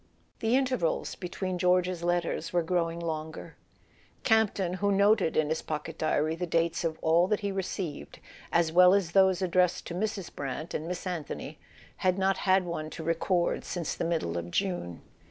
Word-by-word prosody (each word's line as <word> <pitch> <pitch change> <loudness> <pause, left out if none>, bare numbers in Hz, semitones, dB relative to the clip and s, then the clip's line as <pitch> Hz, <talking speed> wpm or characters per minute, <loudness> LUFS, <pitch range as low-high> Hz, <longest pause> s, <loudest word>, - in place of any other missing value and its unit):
The 225 +2 +2
intervals 255 -11 0
between 185 0 -4
George's 180 0 +2
letters 175 0 -1
were 175 -1 +1
grow¬ 170 0 0
ing 170 - -7
longer. 160 -1 -5 0.7
Campton, 210 -5 +2
who 200 0 +2
noted 200 -3 +3
in 155 -1 +2
his 160 - -1
pocket 150 -1 -5
diary 155 0 +1
the 175 +2 -3
dates 165 0 0
of 160 -1 -1
all 170 +3 +4
that 210 +2 0
he 200 -1 -1
received, 190 -5 -4 0.3
as 170 -1 +2
well 180 +2 +7
as 190 -4 0
those 190 -1 +4
ad¬ 185 -2 -1
dressed 180 0 +2
to - - -6
Mrs. 200 0 -3
Brant 140 +4 -5
and 155 - -3
Miss 180 +1 -4
Anthony, 175 -5 -5 0.4
had 185 0 +1
not 195 0 +2
had 190 -1 +3
one 155 -3 -4
to 160 - -7
record 170 +2 0
since 175 -4 -3
the - - -4
middle 160 - -1
of 85 0 -7
June. 175 - -2
175 Hz, 180 wpm, -29 LUFS, 160-190 Hz, 0.7 s, well